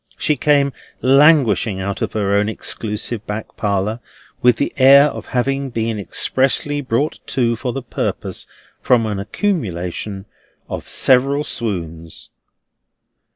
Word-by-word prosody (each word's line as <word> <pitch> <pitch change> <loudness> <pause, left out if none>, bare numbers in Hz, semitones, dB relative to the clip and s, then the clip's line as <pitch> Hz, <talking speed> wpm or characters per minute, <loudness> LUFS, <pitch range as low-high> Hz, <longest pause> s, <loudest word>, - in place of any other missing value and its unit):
She 150 - +1
came 140 0 +2 0.3
languishing 130 - +4
out 100 +1 -4
of - - -2
her 100 -2 0
own 105 +1 +2
exclusive 110 0 -3
back 105 +1 -6
parlour, 105 +2 -1 0.4
with 125 -1 +5
the 140 - -2
air 140 +2 +7
of - - -9
having 135 +2 -1
been 115 -2 -2
expressly 135 +7 +1
brought 135 +3 -1
to 120 -3 +1
for 125 +2 -3
the 135 +1 -5
purpose, 120 - -4 0.3
from 120 -3 +3
an 105 -2 -3
accumulation 100 - -3 0.4
of - - -6
several 135 +3 +3
swoons. 85 - -4
115 Hz, 125 wpm, -19 LUFS, 105-135 Hz, 0.4 s, air